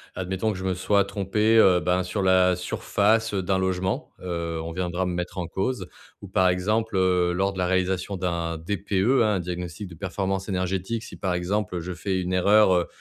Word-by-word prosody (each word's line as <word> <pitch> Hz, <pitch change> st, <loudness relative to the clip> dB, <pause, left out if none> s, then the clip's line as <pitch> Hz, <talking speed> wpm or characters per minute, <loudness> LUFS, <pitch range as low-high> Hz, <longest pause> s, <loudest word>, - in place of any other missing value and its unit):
admettons 95 Hz, +4 st, -2 dB
que -, -, -7 dB
je 95 Hz, -, -6 dB
me 95 Hz, -1 st, 0 dB
sois 100 Hz, +2 st, +2 dB
trompé, 105 Hz, +3 st, +1 dB
heu, 95 Hz, -5 st, +6 dB
ben, 90 Hz, +1 st, +1 dB
sur 90 Hz, +3 st, -3 dB
la 95 Hz, -1 st, +4 dB
surface, 105 Hz, +4 st, 0 dB
heu, 95 Hz, -2 st, -1 dB
d'un 95 Hz, 0 st, +1 dB
logement, 95 Hz, 0 st, -2 dB
heu, 85 Hz, -2 st, -3 dB
on 85 Hz, -, -5 dB
viendra 90 Hz, +1 st, -2 dB
me 90 Hz, -, -2 dB
mettre 90 Hz, +1 st, -4 dB
en 85 Hz, -, -3 dB
cause 125 Hz, +7 st, -3 dB, 0.3 s
ou 100 Hz, -, -10 dB
par 95 Hz, -1 st, +3 dB
exemple, 105 Hz, +5 st, 0 dB
heu, 90 Hz, -2 st, +2 dB
lors 95 Hz, +2 st, +1 dB
de 95 Hz, -, -10 dB
la 90 Hz, -, +1 dB
réalisation 95 Hz, +1 st, 0 dB
d'un 85 Hz, -3 st, -2 dB
DPE, 100 Hz, +5 st, -5 dB, 0.3 s
hein, 105 Hz, -2 st, +2 dB
un -, -, 0 dB
diagnostic 90 Hz, +2 st, -5 dB
de 85 Hz, -, -11 dB
performance 95 Hz, +2 st, -3 dB
énergétique 95 Hz, +4 st, -2 dB
si, -, -, -10 dB
par 95 Hz, -2 st, -1 dB
exemple, 90 Hz, 0 st, -2 dB
je 90 Hz, +2 st, -5 dB
fais 95 Hz, +1 st, -2 dB
une 90 Hz, 0 st, -3 dB
erreur, 100 Hz, +2 st, +5 dB
heu 90 Hz, -1 st, +1 dB
95 Hz, 210 wpm, -25 LUFS, 90-100 Hz, 0.3 s, heu